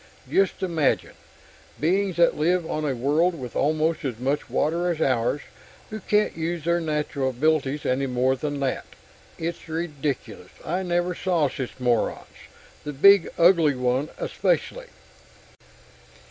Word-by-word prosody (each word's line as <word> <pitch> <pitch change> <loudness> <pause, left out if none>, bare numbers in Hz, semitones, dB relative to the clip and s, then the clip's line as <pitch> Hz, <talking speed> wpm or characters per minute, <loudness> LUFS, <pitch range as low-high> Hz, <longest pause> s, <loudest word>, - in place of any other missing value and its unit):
Just 195 -1 +1
imagine 165 -6 0 0.7
beings 185 +3 +1
that 170 -1 +4
live 170 +2 +1
on 155 0 -2
a 135 -3 -1
world 155 +7 +1
with 125 -2 -7
almost 155 +2 +1
as 130 -5 -3
much 135 +4 -2
water 170 +3 0
as 170 -3 -2
ours, 130 -1 +1 0.5
who 215 - -5
can't 210 +1 +1
use 165 0 -3
their 170 0 +2
natural 150 -3 -1
abilities 145 +2 0
any 135 +2 0
more 130 +1 +1
than 145 +1 -4
that! 135 -1 -2 0.5
It's 165 0 -5
ridiculous. 145 - -4
I 180 +4 -1
never 175 0 0
saw 170 -5 +1
such 130 -1 -6
morons 120 -3 0 0.6
the 150 - -5
big, 200 +6 +6
ugly 170 -4 +5
one 125 +3 0
especially!" - - -1
155 Hz, 135 wpm, -24 LUFS, 135-175 Hz, 0.7 s, big